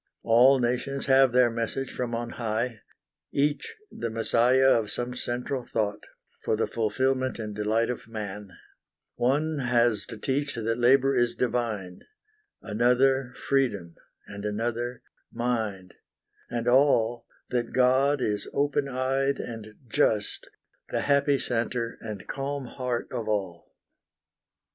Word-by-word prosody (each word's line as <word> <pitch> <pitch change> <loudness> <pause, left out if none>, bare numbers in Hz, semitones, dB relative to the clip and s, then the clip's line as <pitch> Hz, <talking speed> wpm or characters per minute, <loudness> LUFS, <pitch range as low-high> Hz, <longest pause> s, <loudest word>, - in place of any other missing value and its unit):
All 125 +4 +6
nations 125 +3 -1
have 135 -1 +5
their 125 -1 +4
message 115 +3 -3
from 120 -2 -3
on 120 0 -4
high, 115 0 -2 0.5
Each 145 0 0 0.2
the 115 - -4
messiah 120 +4 +3
of 110 -2 +2
some 120 +3 -3
central 125 +1 -3
thought, 105 -3 -2 0.4
For - - +1
the 110 - +1
fulfilment 130 +4 0
and 105 -2 -5
delight 110 +3 +1
of 125 - -7
Man: 105 -2 -6 0.6
One 145 +5 0
has 120 -4 +2
to - - -8
teach 140 +5 -1
that 115 +1 -2
labor 135 +2 +4
is 120 -1 +2
divine; 110 -7 -2 0.6
Another 125 +4 +2
Freedom; 110 -12 0 0.3
and 100 0 -9
another 120 +3 -3 0.3
Mind; 110 -6 -2 0.6
And 120 0 -3
all, 120 -3 +3 0.2
that 120 -1 -1
God 130 +2 +3
is 105 -1 -1
open 145 0 +1
eyed 135 +2 0
and 110 -2 -7
just, 105 -1 0 0.4
The - - -1
happy 140 0 +3
centre 115 -1 -2
and 105 -3 -7
calm 140 0 -3
heart 125 -1 -3
of 120 -4 -4
all. 95 -5 -3
120 Hz, 125 wpm, -27 LUFS, 110-130 Hz, 0.6 s, All